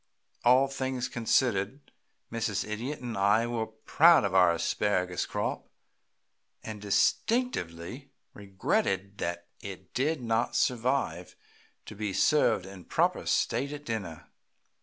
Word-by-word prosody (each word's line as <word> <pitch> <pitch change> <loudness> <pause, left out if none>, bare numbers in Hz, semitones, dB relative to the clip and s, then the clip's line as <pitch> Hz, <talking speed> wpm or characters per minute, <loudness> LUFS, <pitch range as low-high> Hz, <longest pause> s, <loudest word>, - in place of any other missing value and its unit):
All 130 +3 +5
things 130 -2 -3
considered, 120 +1 0 0.4
Mrs. 110 -3 -2
Idiot 120 +8 -4
and 120 -3 -5
I 100 +4 +3
were 115 -2 -2
proud 160 +9 +4
of 100 -2 -1
our 90 -2 +6
asparagus 90 +1 0
crop, - - -3 0.9
and 110 -2 -7
distinctly 120 - 0 0.2
regretted 100 0 -1
that 85 0 -3
it 95 -2 -9
did 145 +4 0
not 115 -1 0
survive 125 +3 0 0.5
to - - -9
be 105 -1 -3
served 150 -10 +3
in 95 -2 -11
proper - - 0
state 140 +1 +1
at 145 0 -8
dinner. 100 -9 -5
110 Hz, 115 wpm, -29 LUFS, 95-130 Hz, 0.9 s, our